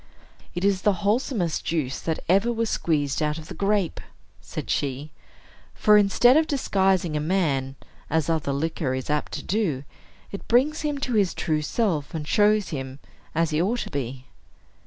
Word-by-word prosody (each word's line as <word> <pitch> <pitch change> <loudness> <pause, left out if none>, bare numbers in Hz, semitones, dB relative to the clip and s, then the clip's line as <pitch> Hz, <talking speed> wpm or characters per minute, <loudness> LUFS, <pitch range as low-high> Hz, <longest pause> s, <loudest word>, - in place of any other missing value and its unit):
"It 175 +2 -1
is 195 -2 +2
the 205 - +3
wholesomest 210 - 0
juice 150 -6 -2
that 160 -1 -3
ever 195 +7 +3
was 230 -1 -1
squeezed 145 -3 0
out 150 0 0
of 160 -1 -10
the - - -6
grape," 200 -3 0 0.4
said - - -7
she; 140 +2 -2 0.6
"for, 210 -1 +5
instead 210 +5 +5
of 315 +1 +4
disguising 190 - +1
a - - +1
man, 150 -6 0 0.3
as 160 -1 +1
other 160 -4 0
liquor 140 -2 -1
is 130 +3 -3
apt 150 0 -1
to - - -4
do, 180 -10 -1 0.5
it 200 - -8
brings 275 +6 +3
him 295 -2 -1
to 255 -4 -2
his 200 -5 +2
true 155 -2 0
self, 165 -4 -1
and 150 -2 -4
shows 210 +1 +3
him 135 -3 -5 0.4
as 165 0 +1
he 155 +1 +1
ought 230 +7 0
to - - -6
be." 130 -2 -4
170 Hz, 175 wpm, -25 LUFS, 150-210 Hz, 0.6 s, for